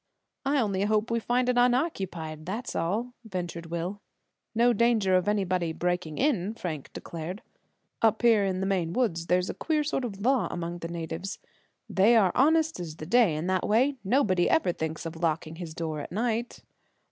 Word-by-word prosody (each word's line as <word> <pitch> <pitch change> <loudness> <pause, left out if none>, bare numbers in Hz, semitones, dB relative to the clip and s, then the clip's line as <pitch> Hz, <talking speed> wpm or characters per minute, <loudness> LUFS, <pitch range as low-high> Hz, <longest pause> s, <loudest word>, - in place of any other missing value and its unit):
"I 285 +1 +2
only 200 -5 0
hope 215 +2 +1
we 230 - +2
find 245 +2 +1
it 250 -1 +3
unoccupied, 190 - 0
that's 225 +7 -4
all," 215 +9 -1
ventured 175 -5 -5
Will. 170 +4 -4 0.5
"No 240 +2 +4
danger 220 -4 +3
of 185 +1 +2
anybody 185 -5 0
breaking 175 -2 -2
in," 225 -7 +1
Frank 160 -9 -5
declared. 170 +4 -6 0.6
"Up 225 +1 +3
here 225 -4 +5
in 190 -1 -1
the - - 0
Maine 180 -4 0
woods 170 -9 0
there's 180 +1 +2
a - - -8
queer 310 -2 0
sort 290 -2 -1
of 205 -5 -5
law 255 +2 +2
among 175 0 -4
the 165 - -5
natives. 170 +3 -5 0.5
They 210 +5 +4
are 195 -5 +5
honest 320 +3 +3
as 165 -3 -6
the 155 - -8
day 210 -3 +4
in 155 +2 -3
that 185 0 0
way. 260 +6 +3
Nobody 190 -5 +2
ever 320 - +3
thinks 160 -1 -4
of 165 0 -5
locking 160 -1 -1
his 165 -3 -7
door 160 -2 -3
at - - -7
night." 230 +4 -2
190 Hz, 180 wpm, -28 LUFS, 170-235 Hz, 0.6 s, here